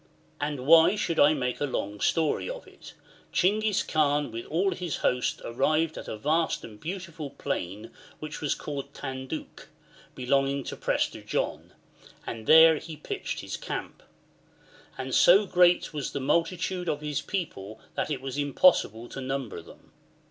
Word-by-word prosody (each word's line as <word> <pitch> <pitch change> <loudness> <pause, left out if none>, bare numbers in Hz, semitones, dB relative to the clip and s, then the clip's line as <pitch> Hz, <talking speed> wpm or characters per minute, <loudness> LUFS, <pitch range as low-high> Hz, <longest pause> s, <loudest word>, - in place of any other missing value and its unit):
And 145 -3 -3
why 165 +5 +7
should 170 -5 -1
I 150 +2 +6
make 125 -3 -2
a - - +2
long 105 -5 -3
story 160 - +1
of - - -7
it? - - -14 0.4
Chinghis 210 +2 +2
Kaan 145 -2 +1
with 115 +1 -6
all 185 +5 +1
his 175 -5 -3
host 125 0 0
arrived 155 +7 +1
at - - -8
a 110 - -5
vast 160 +8 0
and 105 -2 -11
beautiful 170 - -6
plain 105 -6 -4 0.3
which 155 0 -7
was 150 - 0
called 140 -1 -6
Tanduc, 130 -1 -6 0.5
belonging 135 +2 +1
to - - -6
Prester - - -1
John, - - -3 0.5
and 110 -1 -6
there 160 0 +8
he 160 +1 -8
pitched 150 - -5
his - - -5
camp; - - -6 1.0
and 130 0 -5
so 195 +4 +6
great 180 -2 +3
was 145 -3 -4
the 140 - -2
multitude 175 +5 0
of 150 -1 -2
his 150 -1 -2
people 110 - -5
that - - -2
it 140 -4 -3
was 135 +1 -4
impossible 140 - +3
to 135 - -7
number 130 -8 -4
them. - - -17
145 Hz, 155 wpm, -27 LUFS, 130-165 Hz, 1.0 s, there